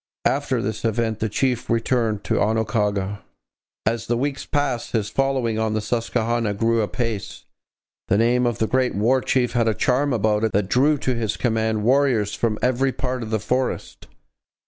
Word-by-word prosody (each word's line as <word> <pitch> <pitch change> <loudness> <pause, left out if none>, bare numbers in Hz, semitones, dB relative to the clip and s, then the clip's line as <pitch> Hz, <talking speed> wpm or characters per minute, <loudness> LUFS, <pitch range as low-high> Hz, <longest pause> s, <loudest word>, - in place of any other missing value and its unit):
After - - +1
this 110 +1 -3
event 115 -1 0
the 110 - -1
chief 125 +2 -1
returned 115 -2 0
to - - 0
Oquaga. 105 -2 0 0.7
As 115 +1 -1
the 120 - +1
weeks 135 +2 -2
passed, 145 -5 -1
his 105 -3 0
following 130 -4 0
on 110 -1 0
the - - +1
Susquehanna 115 -1 -1
grew 115 +2 +2
apace. 110 -2 -3 0.6
The 100 - +2
name 120 +2 +3
of 120 - -1
the 110 - +1
great 130 +2 +1
War 120 +6 +2
Chief 125 -2 +1
had 120 -1 +1
a 110 - +2
charm 135 +5 +1
about 110 -2 +1
it 110 - 0
that 100 -1 +1
drew 145 +6 +3
to 130 -1 -1
his 110 -3 -2
command 110 -2 0
warriors 125 -4 +2
from 110 -2 0
every 130 +2 +2
part 130 -1 -3
of 110 - -5
the 110 0 0
forest. 125 +5 -2
115 Hz, 175 wpm, -22 LUFS, 110-125 Hz, 0.7 s, name